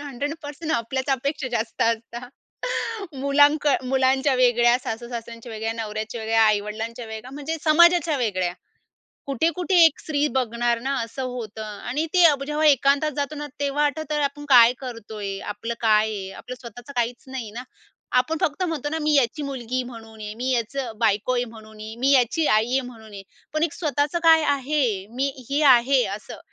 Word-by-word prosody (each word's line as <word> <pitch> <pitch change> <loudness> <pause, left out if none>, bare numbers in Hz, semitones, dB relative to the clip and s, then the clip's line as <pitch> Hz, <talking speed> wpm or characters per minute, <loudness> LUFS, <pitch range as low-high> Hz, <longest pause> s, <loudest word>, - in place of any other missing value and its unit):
100% 290 +3 -5
आपल्याच 260 +2 -2
अपेक्षा 270 +1 -1
जास्त 225 -1 -1
असता. 230 +2 -2 0.9
मुलां 290 +2 +5
क 290 -2 +3
मुलांच्या 265 +1 +2
वेगळ्या, 240 -1 +4
सासूसासऱ्यांच्या 235 0 -6
वेगळ्या, 220 +1 -3
नवऱ्याच्या 220 0 -5
वेगळ्या, 225 0 +2
आई-वडिलांच्या 220 +3 -1
वेगळ्या, 220 +3 -8
म्हणजे 295 +3 -4
समाजाच्या 340 0 +5
वेगळ्या. 185 -7 -1 0.7
कुठे-कुठे 330 +7 0
एक 320 -3 +4
स्त्री 295 -1 0
बघणार 240 -1 0
ना, 270 +3 -2
असं 230 +4 -7
होतं. 220 -3 -6 0.3
आणि 295 +6 -1
ते 360 -1 +6
अब 285 -4 +4
जेव्हा 300 +1 +1
एकांतात 285 +2 +3
जातो 285 +1 -2
ना, 295 0 -5
तेव्हा 285 +1 +1
आठवतं 305 +1 -3
अरे 295 -1 +1
आपण 285 +1 -4
काय 245 -3 +8
करतोय? 220 -6 -6 0.2
आपलं 230 +3 -5
काय 215 -1 +3
आहे? 195 -3 -5
आपलं 250 - -8
स्वतःचं 245 +2 -10
काहीच 240 +1 -1
नाही 260 -5 -6
ना? 235 +4 -7 0.6
आपण 315 +5 -2
फक्त 355 0 0
म्हणतो 320 -5 -2
ना, 320 +2 -2
"मी 300 0 +2
याची 280 +2 +2
मुलगी" 255 -2 -3
म्हणून 225 -2 -11
आहे. 210 0 -6
"मी 250 +3 -2
याचं 245 +1 -2
बायको 220 +2 +1
आहे" 245 0 +1
म्हणून 220 -1 -13
आहे, 215 +1 -7
"मी 270 - +4
याची 270 +5 +3
आई 220 +3 +1
आहे" 265 - +3
म्हणून 220 -3 -13
आहे. 200 -1 -8 0.3
पण 310 - 0
एक 325 -2 +1
स्वतःचं 300 -1 -1
काय 320 -1 +7
आहे? 285 +2 -1 0.3
मी 270 +2 +1 0.2
हे 285 +2 +1
आहे, 250 +2 +3
असं? 210 - -11
255 Hz, 170 wpm, -23 LUFS, 225-290 Hz, 0.9 s, काय